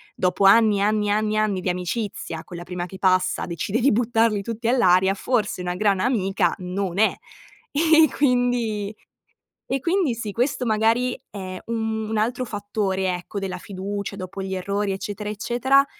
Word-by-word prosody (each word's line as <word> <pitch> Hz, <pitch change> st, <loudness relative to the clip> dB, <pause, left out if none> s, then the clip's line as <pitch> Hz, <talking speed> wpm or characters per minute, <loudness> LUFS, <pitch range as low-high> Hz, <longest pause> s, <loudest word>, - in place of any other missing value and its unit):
dopo 185 Hz, +2 st, +1 dB
anni, 210 Hz, 0 st, +6 dB
anni, 210 Hz, 0 st, +1 dB
anni, 215 Hz, +1 st, +1 dB
anni 210 Hz, -3 st, +1 dB
di 185 Hz, -, -1 dB
amicizia, 180 Hz, -1 st, -3 dB
con 175 Hz, -, -11 dB
la 170 Hz, -, -6 dB
prima 175 Hz, 0 st, -5 dB
che 190 Hz, +1 st, -10 dB
passa 185 Hz, -1 st, +2 dB
decide 180 Hz, -, -2 dB
di 270 Hz, +4 st, +4 dB
buttarli 225 Hz, -2 st, +2 dB
tutti 230 Hz, +1 st, -4 dB
all'aria, 190 Hz, -6 st, +4 dB
forse 210 Hz, -3 st, -1 dB
una 180 Hz, 0 st, -2 dB
gran 195 Hz, 0 st, +1 dB
amica 195 Hz, -6 st, +1 dB
non 185 Hz, +1 st, -3 dB
è. 220 Hz, -, +4 dB, 0.6 s
E 320 Hz, +2 st, +5 dB
e -, -, +6 dB
quindi 245 Hz, -6 st, 0 dB, 0.7 s
e 270 Hz, -, 0 dB
quindi 335 Hz, -4 st, +1 dB
sì, 215 Hz, -2 st, -4 dB
questo 250 Hz, +3 st, -1 dB
magari 225 Hz, +3 st, +1 dB
è 185 Hz, -2 st, -7 dB
un 220 Hz, -1 st, -2 dB
un 220 Hz, -, -1 dB
altro 245 Hz, +4 st, 0 dB
fattore, 205 Hz, -3 st, -1 dB
ecco, 180 Hz, +3 st, -6 dB
della 190 Hz, -2 st, -3 dB
fiducia 200 Hz, +2 st, -5 dB
dopo 190 Hz, 0 st, -6 dB
gli 190 Hz, 0 st, -3 dB
errori, 200 Hz, +2 st, -1 dB
eccetera, 205 Hz, +2 st, -4 dB
eccetera, 245 Hz, +6 st, +2 dB
210 Hz, 165 wpm, -23 LUFS, 190-230 Hz, 0.7 s, anni